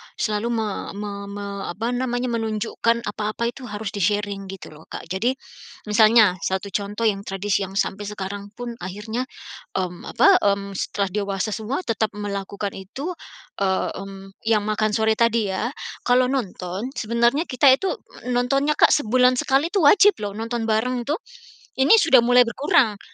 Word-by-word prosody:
selalu 215 0 -1
me 220 -1 0 0.3
me 205 0 -5 0.2
me 205 0 -6 0.2
apa 225 +7 -3
namanya, 245 0 -1
menunjukkan 230 +1 -1
apa-apa 215 +3 -2
itu 255 -1 -10
harus 210 0 -5
di-sharing 205 0 -1
gitu 190 -3 -9
loh 155 +1 -15
Kak. - - -7
Jadi 235 +8 0 0.5
misalnya, 215 -3 +5
satu 190 +2 -2
contoh 205 +3 -3
yang 200 -2 0
tradisi 195 +1 -1
yang 195 - -11
sampai 205 0 -1
sekarang 200 0 -6
pun 245 0 -5
akhirnya, 210 +7 -4 0.5
mmm, 180 -2 -3
apa, - - +5
mmm, 200 0 0
setelah 200 -2 -1
dewasa 200 +1 -2
semua 225 - -3
tetap 220 -2 -1
melakukan 200 0 -4
itu, 265 - -6 0.5
eee, 190 -1 0
mmm, 195 0 -9 0.2
yang 215 -2 +3
makan 215 0 0
sore 220 -1 +2
tadi 230 -3 +2
ya. 205 +5 -1 0.4
Kalau 250 +1 +4
nonton 195 -4 -3
sebenarnya 235 +6 +1
kita 265 +3 +3
itu 375 +8 0 0.4
nontonnya 275 +5 +1
Kak - - +6
sebulan 255 -1 +3
sekali 270 +4 +2
itu 390 -5 +2
wajib 405 +7 +7
loh, 205 - -2
nonton 230 +1 -3
bareng 240 +3 0
tuh. 295 +7 -2 0.6
Ini, 275 +12 +7
sudah 320 - +6
mulai 245 +1 +5
berkurang. 235 -4 +2
215 Hz, 155 wpm, -23 LUFS, 200-245 Hz, 0.6 s, wajib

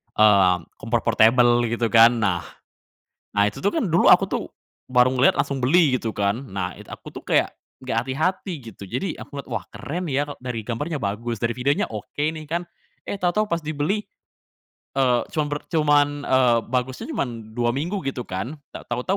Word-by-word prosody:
mmm, 95 -5 +4
kompor 115 +1 0
portabel, 120 +2 +4
gitu 115 0 -1
kan. 115 +1 +7
Nah, 90 -5 0 0.9
nah, 100 0 +3
itu 105 - -8
tuh, 200 - +3
kan, 320 - 0
dulu 165 - +3
aku - - +5
tuh, - - -2 0.4
baru 125 0 +4
ngelihat, 130 +2 +5
langsung 140 -2 -2
beli, 150 -1 +4
gitu 115 -3 -4
kan. 100 +1 0
Nah 95 -5 -4
it - - -12
aku - - -9
tuh - - -10
kayak, - - +1 0.2
nggak 130 -3 -3
hati-hati, 170 +8 -1 0.2
gitu. 100 - -11
Jadi 125 - -3
aku 145 - -7
ngelihat, - - -16
"Wah, - - -3
keren 175 +5 -5
ya, 145 +2 0
e 145 - -6
dari 125 -3 -3
gambarnya 140 +8 -3
bagus, 110 +2 -3
dari 115 +1 -1
videonya 140 +3 +1
oke, 110 +6 -8
nih," 155 +1 -1
kan. 170 +4 -2 0.4
Eh, - - -4
tahu-tahu 180 +4 +2
pas 170 -3 0
dibeli, 155 +6 -1 1.0
eee, 125 -3 +3
cuman 155 -2 -1
bert 145 - -3
cuman, 145 -2 +3 0.2
eee, 125 -3 +4
bagusnya 130 0 -2
cuman 115 -4 -4
2 120 0 +1
minggu, 170 +10 -2
gitu 130 -3 -3
kan. 100 +12 -4 0.2
Tak - - -10
tau-tau, 185 +11 0
125 Hz, 185 wpm, -23 LUFS, 115-150 Hz, 1.0 s, kan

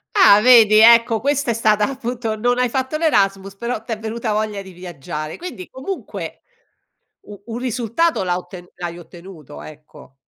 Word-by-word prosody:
Ah 210 - +6
vedi, 225 -3 +6
ecco, 230 0 +6
questa 285 -2 0
è - - 0
stata 215 -1 +2
appunto 245 -4 -4
non 245 +3 0
hai 250 0 +2
fatto 260 +4 -2
l'Erasmus, 195 - 0
però 235 +1 -4
t'è 225 -1 -5
venuta 220 0 -4
voglia 210 -1 -2
di 190 -1 -12
viaggiare. 155 -3 -7
Quindi 245 - -8
comunque, 310 +9 -7 0.8
u 205 -1 -13
un 230 0 -6
risultato 250 +6 -1
la 180 -1 -1
otten 180 0 -10
l'hai 175 -1 -7
ottenuto, 170 -4 -13
ecco. 150 -3 -15
220 Hz, 160 wpm, -19 LUFS, 190-245 Hz, 0.8 s, Ah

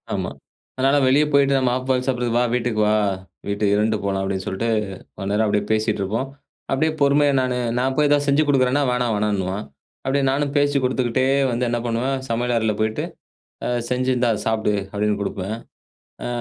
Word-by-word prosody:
ஆமா. - - -2 0.4
அதனால 135 +2 +3
வெளிய 140 +3 +5
போயிட்டு 140 -1 +4
நம்ம 130 -2 +2
ஆஃப் 130 0 -7
பாயில் 130 -1 +1
சாப்பிடுறது 125 -3 -1
வா! 120 - +3
வீட்டுக்கு 120 -3 0
வா! 105 - +3 0.5
வீட்டுக்கு 100 0 +1
இருந்துட்டு 110 +1 +2
போலாம் 100 -1 -1
அப்பிடின்னு 95 -1 -2
சொல்லிட்டு, 115 +5 -2 0.5
கொஞ்ச 100 -1 -5
நேரம் 105 +2 +2
அப்பிடியே 105 0 +1
பேசிட்டு 110 -1 0
இருப்போம். 110 +7 -2 0.4
அப்பிடியே 155 +4 +1
பொறுமையா 140 0 +4
நானு, 130 -1 0 0.2
நான் 130 +1 0
போய் 150 - +4
எதாவது 145 0 +2
செஞ்சு 140 +2 +4
கொடுக்குறேன்னா 135 0 +3
வேணாம் 125 -2 0
வேணான்னுவான். 100 -1 -1 0.4
அப்பிடியே 135 +1 +1
நானும் 140 +1 0
பேச்சு 145 0 +2
கொடுத்துக்கிட்டே 130 0 +1 0.2
வந்து 120 +1 0
என்ன 120 0 0
பண்ணுவேன் 120 +4 0
சமையல் 120 +1 0
அறையில 110 -1 +1
போயிட்டு 110 0 0 0.6
அ - - -1 0.2
செஞ்சி 125 +1 0
இந்தா 120 -1 +2 0.2
சாப்பிடு! 110 -1 +1 0.2
அப்பிடின்னு 105 0 0
கொடுப்பேன். 100 +1 -3 0.7
ஆ - - -2
120 Hz, 175 wpm, -22 LUFS, 105-135 Hz, 0.7 s, வெளிய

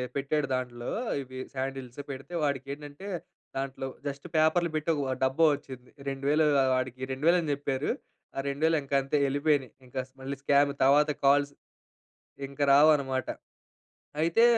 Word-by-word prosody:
పెట్టాడు 140 +1 0
దాంట్లో. 120 -1 -4 0.3
ఇది 130 0 -9 0.2
శాండిల్స్ 135 -1 -5
పెడితే 135 +6 -8
వాడికి 140 -2 -1
ఏంటంటే, 145 +5 -9 0.5
దాంట్లో 135 0 -3 0.2
జస్ట్ 140 +2 -5
పేపర్లు 165 +2 +3
పెట్టి 155 +2 0 0.3
డబ్బా 135 +5 +3
వచ్చింది. 130 -3 -11 0.2
2,000 140 +3 +2 0.3
వాడికి, 130 0 -3
2,000 160 +7 +3
అని 155 -3 -2
చెప్పారు. 140 0 -1 0.4
ఆ - - -2
2,000 160 +3 +2
ఇంకా 140 0 -2
అంతే, 135 +2 0
వెళ్ళిపోయినాయి. 140 -2 +1
ఇంక 125 - -19 0.3
మళ్ళీ 135 +1 -4
స్కామ్ 140 0 +4
తర్వాత 150 +2 +5
కాల్స్ 140 +1 +4 0.9
ఇంక 140 +1 -8
రావనమాట. 140 -3 +4 0.9
అయితే 170 +8 +4
140 Hz, 130 wpm, -29 LUFS, 135-150 Hz, 0.9 s, తర్వాత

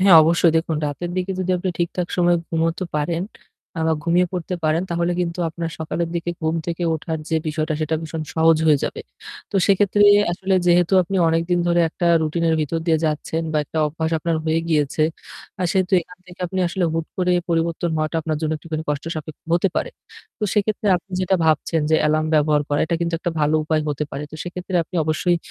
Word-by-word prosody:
হ্যাঁ 190 -3 +8
অবশ্যই 165 +1 +3
দেখুন 160 -1 0
রাতের 145 +5 -4
দিকে 185 +1 -1
যদি 185 0 -1
আপনি 180 +1 -3
ঠিকঠাক 175 +1 -1
সময়ে 175 -1 +4
ঘুমাতে 165 +2 0
পারেন 165 +3 -1 0.6
আ - - -1
বা 160 - +3
ঘুমিয়ে 175 +2 +3
পড়তে 180 0 -3
পারেন, 155 +2 +2
তাহলে 170 +1 0
কিন্তু 170 0 -2
আপনার 165 +1 -5
সকালের 160 +1 -2
দিকে 170 0 -2
ঘুম 160 0 0
থেকে 170 0 -3
ওঠার 160 +1 -4
যে 160 - +1
বিষয়টা 155 0 -1
সেটা 155 +1 0
ভীষণ 160 0 -5
সহজ 160 0 +5
হয়ে 150 -2 +5
যাবে। - - -4 0.5
তো - - -1
সেক্ষেত্রে 200 +1 +3 0.3
আসলে 190 +2 -1
যেহেতু 175 +1 +4
আপনি 190 +2 -3
অনেকদিন 165 +2 +1
ধরে 175 0 +3
একটা 175 +2 -3 0.2
রুটিন 160 +2 -1
এর 160 - +3
ভিতর 155 +2 -1
দিয়ে 160 -2 +3
যাচ্ছেন 155 +1 -1
বা 155 - +2
একটা 160 - -5
অভ্যাস 160 +2 -3
আপনার 165 +1 -1
হয়ে 160 +1 +1
গিয়েছে। 150 -1 +1 0.6
আ - - +1
সেহেতু 190 0 0
এখান 180 +2 -16
থেকে 180 0 -14
আপনি 185 +2 -4
আসলে 180 +1 -1
হুট 165 0 -2
করে 180 -1 +1 0.2
পরিবর্তন 165 0 0
হওয়াটা 155 +1 -1
আপনার 155 0 -1
জন্য 160 -1 -1
একটুখানি 155 0 -5
কষ্ট 145 -1 -3
সাপেক্ষ 155 -1 -7
হতে 175 +3 +3
পারে। - - -1 0.5
তো - - -10
সেক্ষেত্রে 210 0 0
আপনি 185 +2 -11
যেটা 185 +1 +2
ভাবছেন 160 +1 +2
যে 160 - +5
এলার্ম 155 +1 +1
ব্যবহার 150 -1 +3
করা 145 - +1
এটা 170 - -1
কিন্তু 170 0 -1
একটা 175 - -2
ভালো 150 +1 +2
উপায় 155 0 +1
হতে 150 0 -1
পারে। 140 - -5
তো - - -10
সেক্ষেত্রে 180 +1 -4
আপনি 175 - -17
অবশ্যই 160 +3 +1
165 Hz, 205 wpm, -21 LUFS, 155-175 Hz, 0.6 s, হ্যাঁ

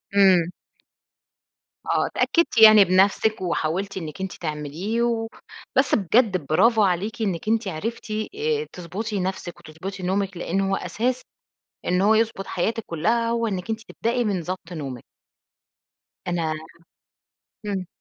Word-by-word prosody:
إمم. 185 -4 +5 1.4
آه، - - +1
اتأكدتِ 335 -8 +1
يعني 215 -2 +9
بنفسِك، 195 +4 +3
وحاولتِ 185 +2 -1
إنِّك 165 0 -6
أنتِ 190 - -3
تعمليه، 160 +8 -3
وبس 235 +3 -1
بجد 210 +1 +3
برافو 220 - +4
عليكِ 200 +4 0
إنِّك 190 -3 -2
أنتِ 225 -1 +1
عرفتِ 220 +6 -4 0.2
آآ 450 +1 -1
تضبطي 200 +5 -4
نفسِك، 185 -1 -4
وتضبطي 185 +5 -8
نومِك 190 0 -1
لإن 180 +3 -1
هو 195 0 +1
أساس 235 +8 -2 0.6
إن 180 +1 +2
هو 210 +3 +5
يضبط 220 -3 0
حياتِك 225 +5 -1
كلها 230 +9 +1
هو 230 0 0
إنك 190 -1 -4
أنتِ 220 0 -2
تبدئي 240 +2 0
من 200 -5 -1
ضبط 180 0 -6
نومِك. 135 -7 -6 1.2
أنا 170 -3 0 1.1
إمم. 195 -3 -2
195 Hz, 125 wpm, -24 LUFS, 175-225 Hz, 1.4 s, يعني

